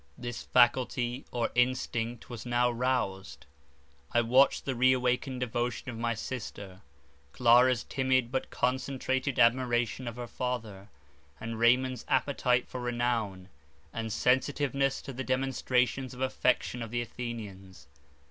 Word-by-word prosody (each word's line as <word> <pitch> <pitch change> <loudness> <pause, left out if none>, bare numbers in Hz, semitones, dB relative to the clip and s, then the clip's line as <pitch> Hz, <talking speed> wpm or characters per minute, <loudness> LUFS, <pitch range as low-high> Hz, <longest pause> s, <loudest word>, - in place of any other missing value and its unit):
This 120 -1 -5
faculty, 125 0 +2
or 120 -2 -1
instinct, 120 -2 0
was 120 -2 -7
now 120 0 +2
rouzed. 120 -6 -2 0.7
I 120 - +3
watched 125 +4 +3
the 135 - -1
re 130 +1 +4
awakened 125 +1 -1
devotion 120 +1 -2
of 115 - -8
my 115 0 0
sister; 105 -5 -7 0.5
Clara's 125 0 +5
timid, 130 -3 0
but 130 - -2
concentrated 130 +1 -1
admiration 120 0 +2
of 115 - -5
her 120 0 -5
father, 115 -5 -5 0.5
and 115 0 -5
Raymond's 125 +1 +3
appetite 125 -3 +1
for 125 - -6
renown, 120 -6 -2 0.4
and 115 -1 -4
sensitiveness 135 +3 +1
to 135 - -7
the 130 +2 -4
demonstrations 130 -1 0
of 125 - -9
affection 125 -1 0
of 115 - -5
the 120 +1 -1
Athenians. 110 -6 -8
125 Hz, 130 wpm, -30 LUFS, 115-130 Hz, 0.7 s, Clara's